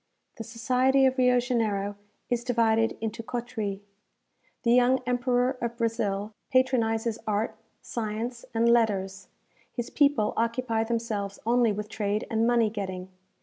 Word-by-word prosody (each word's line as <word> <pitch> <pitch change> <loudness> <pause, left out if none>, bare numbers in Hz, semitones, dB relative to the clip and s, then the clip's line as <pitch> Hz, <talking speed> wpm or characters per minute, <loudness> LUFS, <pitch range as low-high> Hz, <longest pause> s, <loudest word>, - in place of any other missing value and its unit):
The 225 - -5
society 255 +3 +2
of 260 0 +2
Rio 250 -1 +5
Janeiro 215 -5 -1 0.3
is 240 -1 -1
divided 225 -2 +2
into 225 0 -3
coteries. 225 -4 -4 0.8
The 235 - +4
young 250 +1 +4
Emperor 245 0 +1
of 235 0 -3
Brazil 220 -3 -1 0.2
patronizes 230 -4 +2
art, 215 +1 0 0.3
science, 230 +2 -4
and 230 +1 +3
letters; 195 -5 +1 0.4
his 240 -1 -5
people 280 -7 +3
occupy 230 0 0
themselves 220 -4 -2
only 235 -1 +3
with 210 +1 -4
trade 210 0 -2
and 225 0 +2
money 235 -3 +3
getting. 190 -3 -5
230 Hz, 130 wpm, -27 LUFS, 215-245 Hz, 0.8 s, Rio